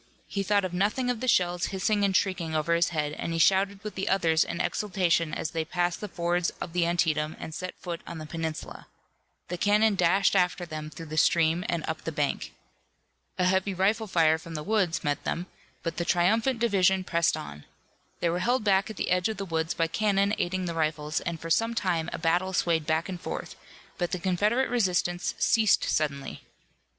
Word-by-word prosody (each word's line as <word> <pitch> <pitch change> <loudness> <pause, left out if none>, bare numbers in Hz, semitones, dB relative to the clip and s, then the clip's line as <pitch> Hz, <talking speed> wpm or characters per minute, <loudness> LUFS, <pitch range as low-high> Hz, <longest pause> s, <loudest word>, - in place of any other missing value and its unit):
He 200 - -3
thought 195 -2 +1
nothing 215 +7 +1
of 240 - -4
the 255 - -3
shells 180 -5 +2
hissing 205 +2 0
and 195 -1 +3
shrieking 175 -5 -1
over 155 +2 +1
his 170 +1 +3
head, 150 -3 -2
and 165 - -3
he - - -1
shouted 195 +3 +3
with 210 - -5
the 195 - -2
others 165 -4 +3
in 170 - -5
exultation 180 -6 +1
as 155 - -3
they 165 -1 -1
passed 175 +1 -1
the 210 - -4
fords 175 -1 0
of 165 - -6
the 175 -1 +2
Antietam 160 -3 0
and 160 - -7
set 185 +3 -5
foot 170 -2 -5
on 170 - -6
the 155 - -7
peninsula. 160 0 -5 0.6
The 180 0 -4
cannon 210 +2 +4
dashed 190 +1 +3
after 180 0 +1
them 155 -2 -6
through 165 +1 -9
the 155 0 -6
stream 165 +2 +3
and 170 -2 -1
up 160 0 -3
the 165 - -4
bank. 145 -2 -2 0.9
A 180 - +2
heavy 190 +1 +1
rifle 210 +4 +1
fire 160 -4 +3
from 165 0 -9
the 150 - -4
woods 195 -3 0
met 145 -2 -1
them, 175 - -2 0.4
but 165 - -3
the 175 - 0
triumphant 220 +9 +2
division 190 -5 +2
pressed 170 -2 +1
on. 75 0 -9 0.6
They 170 - +2
were 175 - -1
held 245 +5 +1
back 195 0 +2
at 215 - -8
the - - -2
edge 180 +2 +2
of 220 - -4
the 195 - -4
woods 165 -1 -1
by 165 - +2
cannon 200 +4 +1
aiding 185 +1 -1
the 170 - -3
rifles, 155 -1 -1
and 170 -1 -4
for 165 +1 -6
some 225 +6 +2
time 170 -6 0
a - - -4
battle 175 +3 +1
swayed 165 -3 +1
back 160 +1 +1
and 180 -2 -6
forth, - - -5 0.4
but 175 -1 0
the - - -2
Confederate 210 +8 +1
resistance 180 -6 0
ceased 220 -3 +3
suddenly. 140 -3 -2
175 Hz, 205 wpm, -27 LUFS, 165-195 Hz, 0.9 s, cannon